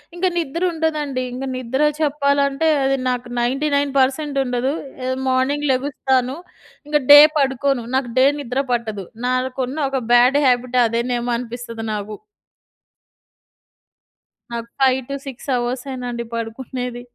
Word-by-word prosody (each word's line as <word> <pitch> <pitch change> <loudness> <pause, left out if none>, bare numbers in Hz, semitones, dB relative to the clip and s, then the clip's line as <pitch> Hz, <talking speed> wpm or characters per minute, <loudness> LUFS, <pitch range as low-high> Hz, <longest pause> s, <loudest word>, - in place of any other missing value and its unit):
ఇంకా 360 +2 +1
నిద్ర 335 +1 -2
ఉండదండి. 300 -5 -1
ఇంకా 265 +2 -4
నిద్ర 255 +2 -2 0.2
చెప్పాలంటే, 280 0 +1 0.2
అది 270 0 +2
నాకు 250 0 -2
99% 275 +2 +1
ఉండదు. 250 +1 -1 0.4
ఎ - - -1 0.2
మార్నింగ్ 265 +3 +1
లెగుస్తాను. 260 -1 0 0.5
ఇంక 295 0 +2
డే 290 - +12 0.2
పడుకోను. 270 -2 +1
నాకు 255 -3 -1
డే 260 - +6
నిద్ర 265 0 -1
పట్టదు, 220 -5 -2 0.2
నాకున్న 260 +3 -1 0.3
బ్యాడ్ 250 +4 +5
హాబిట్ 250 0 +2
అదేనేమో 240 +1 -1
అనిపిస్తుంది 235 -1 -6
నాకు. 210 0 -5 2.4
నాకు 235 0 -5
5-6 265 +1 -1
అవర్సేనండి 245 -1 -4
పడుకునేది. 245 +2 -5
260 Hz, 105 wpm, -20 LUFS, 245-280 Hz, 2.4 s, డే